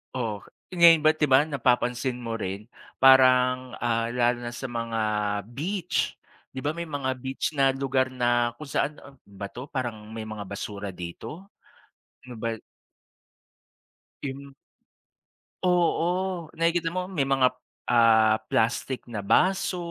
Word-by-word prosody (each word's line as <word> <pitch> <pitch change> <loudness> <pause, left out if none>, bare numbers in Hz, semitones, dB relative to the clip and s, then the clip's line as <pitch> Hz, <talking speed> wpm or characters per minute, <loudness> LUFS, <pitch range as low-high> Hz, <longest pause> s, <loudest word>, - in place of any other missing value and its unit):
Oo. 110 -5 -3 0.3
Ngayon 170 -2 +8
ba't 155 +1 +5
di - - +4
ba 130 -1 +6
napapansin 125 -3 0
mo 115 -2 -4
rin, 100 +2 -5 0.3
parang, 130 -1 +5
ah, 115 -1 0
lalo 120 0 +1
na 120 - -4
sa 135 +2 -5
mga 115 -2 -3 0.5
beach, 175 +8 -2 0.4
di 130 - -6
ba 145 - +1
may 170 0 -5
mga 140 -3 -2
beach 130 +3 -3
na 135 -1 +4
lugar 135 -1 +1
na 120 -1 +1
kung 155 - -8
saan, 150 +2 -1
a 140 - -14
ano - - -32
ba 100 0 -7
'to, 125 +3 -8
parang 115 -5 -4
may 110 - -5
mga 110 -1 -6
basura 100 0 -5
dito. 90 - -8 0.8
Ano 125 -1 -10
ba 115 - -1 1.8
Im 140 0 -6 1.1
Oo, 180 0 +1
nakikita 165 0 +1
mo, 180 +2 -3
may 185 -5 -3
mga, 135 -1 +3 0.4
ah, 110 -2 +4
plastik 120 +3 0
na 115 -4 -5
baso, 180 - +2
130 Hz, 140 wpm, -26 LUFS, 115-150 Hz, 1.8 s, Ngayon